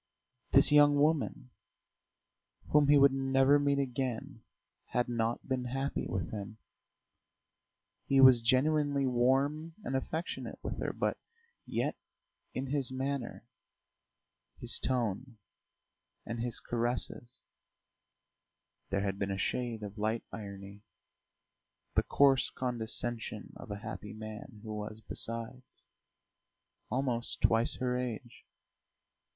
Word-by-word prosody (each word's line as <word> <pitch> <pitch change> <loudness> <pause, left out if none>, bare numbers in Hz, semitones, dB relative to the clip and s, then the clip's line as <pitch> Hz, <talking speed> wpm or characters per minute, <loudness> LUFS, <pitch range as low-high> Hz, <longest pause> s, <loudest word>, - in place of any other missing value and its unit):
This - - +6
young 145 0 +7
woman 145 - +1 1.2
whom 150 -1 +5
he 145 0 +7
would 140 0 +7
never 135 +1 +4
meet 140 -1 +2
again 130 -3 -3 0.5
had 120 0 +2
not 115 -1 -1
been 130 -2 -1
happy 135 +3 -2
with 90 -3 -3
him; 105 +1 -6 1.5
he 135 - +4
was 130 -3 +9
genuinely 140 +3 +2
warm 135 +6 +1
and 135 - -2
affectionate 160 +6 -3
with - - -4
her, - - -1
but - - -1 0.5
yet - - -1 0.6
in 130 - -2
his 135 -1 -1
manner, 130 -1 -3 1.1
his - - +2
tone, 120 -1 -1 0.9
and 115 +1 -4
his 120 0 -2
caresses 120 +1 -3 1.5
there 100 0 0
had 100 -1 -2
been 100 - -1
a 95 - -2
shade 115 +1 -2
of 105 +1 -7
light 110 +2 0
irony, 100 -1 -8 1.1
the - - +4
coarse 135 -2 +4
condescension 120 -2 -3
of - - -10
a 100 - -4
happy 105 -1 -6
man 110 +1 -9
who 110 -1 -5
was, 105 +1 -5
besides, 115 +3 -6 1.1
almost 125 -2 -1
twice 115 +1 +3
her 125 -1 -1
age. 120 -1 -6
125 Hz, 110 wpm, -32 LUFS, 110-135 Hz, 1.5 s, was